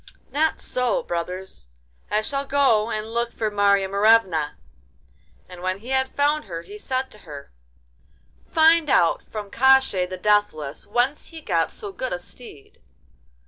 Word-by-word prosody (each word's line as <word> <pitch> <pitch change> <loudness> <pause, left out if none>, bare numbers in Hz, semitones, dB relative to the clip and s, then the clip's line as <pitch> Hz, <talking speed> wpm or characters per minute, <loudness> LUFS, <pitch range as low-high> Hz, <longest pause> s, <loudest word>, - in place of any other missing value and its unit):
'Not 315 +2 +1
so, 250 -3 -1
brothers; 175 - -5 0.4
I 215 +1 +1
shall 275 +4 -2
go 270 -6 +2
and 220 0 -4
look 235 0 -1
for 215 -2 -2
Marya 200 -1 +3
Morevna.' 200 -6 +3 0.9
And 180 -1 -11
when 185 +1 -1
he 230 +5 -12
had 265 0 +1
found 295 0 0
her, 170 -4 -6
he 200 +4 -11
said 260 +3 -3
to 210 - -15
her: 145 -6 -11 1.0
'Find 320 -1 +4
out 170 -9 +3
from 210 -2 -8
Koshchei 265 -8 +4
the 185 - -5
Deathless 185 -8 0
whence 245 +7 0
he 330 - -10
got 310 - 0
so 415 -3 -7
good 260 -9 -4
a - - -1
steed. 175 - -11
215 Hz, 150 wpm, -23 LUFS, 185-265 Hz, 1.0 s, Find